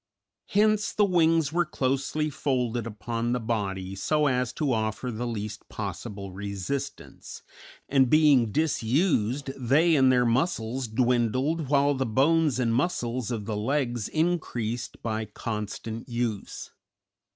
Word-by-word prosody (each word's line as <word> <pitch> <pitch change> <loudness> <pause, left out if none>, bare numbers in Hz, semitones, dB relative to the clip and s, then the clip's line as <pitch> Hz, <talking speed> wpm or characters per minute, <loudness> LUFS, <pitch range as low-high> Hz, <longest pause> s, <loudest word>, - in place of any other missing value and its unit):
Hence 215 +1 +2
the 210 - +3
wings 165 -4 +2
were 175 +1 +3
closely 140 +1 -1
folded 125 -5 -1
upon 115 +2 -3
the 125 - 0
body 100 -5 -2
so 150 +10 +1
as 125 -3 +1
to 145 -4 0
offer 110 +3 -2
the 120 +2 -3
least 105 -2 -5
possible 100 -1 -6
resistance, 100 +7 -6 0.4
and 135 -2 +3
being 145 -7 +5
disused, 140 - +1
they 145 +7 +3
and 130 -2 +5
their 125 -1 +3
muscles 120 -1 0
dwindled, 125 +6 +1
while 140 0 +3
the 130 -2 -1
bones 145 +4 +3
and 120 -3 +1
muscles 125 - -1
of 110 -4 -3
the 110 - -3
legs 120 0 -1
increased 125 -9 -2
by 110 -1 -2
constant 110 +2 -5
use. 120 -4 -3
125 Hz, 130 wpm, -27 LUFS, 110-145 Hz, 0.4 s, being